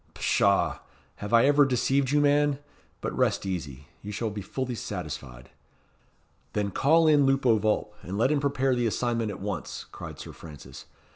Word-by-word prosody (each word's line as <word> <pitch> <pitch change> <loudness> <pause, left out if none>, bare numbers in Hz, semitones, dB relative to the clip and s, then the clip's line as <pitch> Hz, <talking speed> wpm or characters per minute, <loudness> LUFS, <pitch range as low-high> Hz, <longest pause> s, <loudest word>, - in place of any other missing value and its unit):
"Pshaw! - - +2 0.4
Have 105 - -6
I 115 +1 +6
ever 145 +1 +5
deceived 135 +1 +1
you, 145 +1 +3
man? 145 0 +3 0.4
But - - -3
rest - - +1
easy. 75 -8 -5 0.2
You 105 - -7
shall 110 +1 -3
be 105 0 -5
fully 130 +6 -4
satisfied." 75 - -7 1.0
"Then 100 -1 -1
call 160 - +4
in 145 -3 +5
Lupo 130 -5 +3
Vulp, 110 0 0
and 95 +4 -5
let 125 +6 +2
him 150 - +2
prepare 135 -2 +1
the 120 -1 +1
assignment 115 0 -1
at 100 - -6
once," 100 -5 -5
cried - - -8
Sir - - -9
Francis. 75 -6 -11
115 Hz, 165 wpm, -27 LUFS, 100-135 Hz, 1.0 s, I